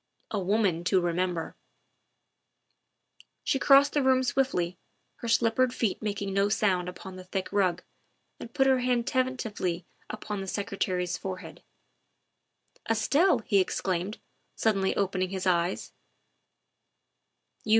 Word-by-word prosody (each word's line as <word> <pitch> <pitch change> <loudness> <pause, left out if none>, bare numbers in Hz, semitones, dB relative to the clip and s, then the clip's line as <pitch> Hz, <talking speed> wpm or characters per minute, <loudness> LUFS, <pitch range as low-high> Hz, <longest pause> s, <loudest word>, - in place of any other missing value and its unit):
A 210 - -1
woman 190 -3 +1
to 185 +1 +3
remember! 175 -1 -1 1.9
She 270 - +1
crossed 280 +1 +6
the 295 - +2
room 260 -1 +3
swiftly, 215 -10 0 0.4
her 235 - -6
slippered 235 +2 +2
feet 220 -5 -1
making 200 -2 -3
no 200 +1 +2
sound 185 -4 +1
upon 185 +1 -9
the 185 - -9
thick 185 +1 -4
rug, 185 -3 +1 0.6
and 230 - -9
put 270 - +2
her 265 -1 +4
hand 245 -1 +1
tentatively 225 -10 -1 0.2
upon 210 -2 -5
the 195 - -6
Secretary's 185 -3 -2
forehead. 185 -1 -7 0.6
" - - -22
Estelle!" 250 - +3
he 200 - +3
exclaimed, 185 +1 -1 0.4
suddenly 195 -3 +1
opening 185 -2 0
his 190 0 -4
eyes. 175 0 0
200 Hz, 120 wpm, -28 LUFS, 185-235 Hz, 1.9 s, crossed